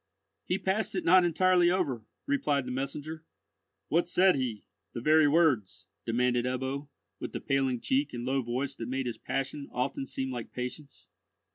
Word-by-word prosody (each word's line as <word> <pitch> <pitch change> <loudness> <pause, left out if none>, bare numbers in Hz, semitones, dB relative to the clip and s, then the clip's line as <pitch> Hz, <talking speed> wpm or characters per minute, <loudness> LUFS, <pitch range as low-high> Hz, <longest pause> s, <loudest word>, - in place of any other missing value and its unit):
"He 180 - +1
passed 195 +3 -1
it - - -2
not 185 +1 +7
entirely 175 +1 +4
over," 150 -11 0 0.2
replied 150 - +1
the 125 - -4
messenger. 145 +4 -4 0.6
"What 170 +2 +1
said 185 +1 +5
he—the 120 -3 -5
very 155 +4 +5
words?" 145 - +2 0.2
demanded 120 +1 +2
Ebbo, 130 +3 -2 0.3
with - - -6
the - - -3
paling 135 -2 0
cheek 270 +2 +1
and 120 0 -5
low 135 +1 +1
voice 130 +3 -2
that 115 - -5
made 135 0 -1
his 120 - -4
passion 135 +1 -3
often 135 +2 -2
seem 130 0 -3
like 120 -3 -6
patience. 125 +4 -7
135 Hz, 160 wpm, -29 LUFS, 125-165 Hz, 0.6 s, not